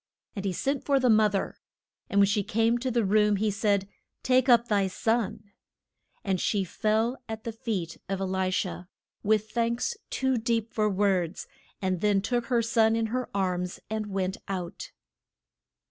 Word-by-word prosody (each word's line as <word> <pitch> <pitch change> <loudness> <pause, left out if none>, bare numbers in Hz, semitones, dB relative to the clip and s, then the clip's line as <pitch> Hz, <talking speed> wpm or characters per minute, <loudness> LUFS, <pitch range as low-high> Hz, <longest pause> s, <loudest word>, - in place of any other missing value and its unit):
And 200 -1 -4
he 195 - +1
sent 275 +9 -1
for 280 -2 +2
the 250 -2 +4
moth 215 -2 +4
er. 195 - -2 0.5
And 200 - +2
when 200 - +7
she 205 +1 +1
came 225 +4 +1
to 260 +2 -2
the 235 -3 +1
room 210 +1 +3
he 210 +1 +1
said, 200 -1 +1 0.4
Take 255 0 +3
up 235 -1 +6
thy 200 -3 +2
son. 215 +1 -1 0.7
And 190 -3 0
she 205 -3 +1
fell 220 +7 0
at 220 0 -5
the 230 - -3
feet 215 -8 -4
of 195 -1 -1
E - - -1
li 190 0 0
sha, 185 -1 -2 0.4
with 215 0 +1
thanks 235 - 0
too 265 -2 0
deep 230 -1 -1
for 215 -1 +2
words, 190 -3 0 0.4
and 185 -2 0
then 205 -2 +3
took 235 +3 -1
her 240 -3 +2
son 225 -1 +3
in 225 0 +1
her 255 0 -2
arms 180 -1 -1
and 215 -1 -2
went 190 -1 -2
out. 180 -3 -5
215 Hz, 175 wpm, -27 LUFS, 195-230 Hz, 0.7 s, when